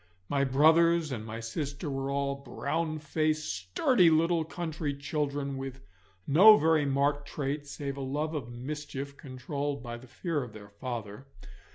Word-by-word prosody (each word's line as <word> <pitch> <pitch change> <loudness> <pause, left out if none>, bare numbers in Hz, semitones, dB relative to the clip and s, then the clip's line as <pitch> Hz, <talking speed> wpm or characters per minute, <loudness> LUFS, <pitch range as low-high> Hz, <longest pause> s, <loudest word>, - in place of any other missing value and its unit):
My 140 -1 +2
brothers 160 +4 +4
and 115 -4 -4
my 110 +1 -6
sister 140 +7 -4
were 135 -1 -2
all 140 0 -1
brownfaced, 155 +3 -1
sturdy 100 - +3
little 165 +1 +3
country 160 -3 -4
children, 140 -1 -2
with 135 0 -6 0.4
no 205 +9 +8
very 160 -3 +3
marked 140 +1 +1
traits 145 0 -3
save 140 -1 -5
a - - -4
love 150 +4 -2
of 135 -6 -4
mischief 140 +2 -6
controlled 140 0 -4
by 120 -1 -5
the 125 +2 -14
fear 150 +4 -2
of 120 -4 -7
their 105 -1 -11
father. 110 +2 -6
140 Hz, 150 wpm, -30 LUFS, 130-155 Hz, 0.4 s, no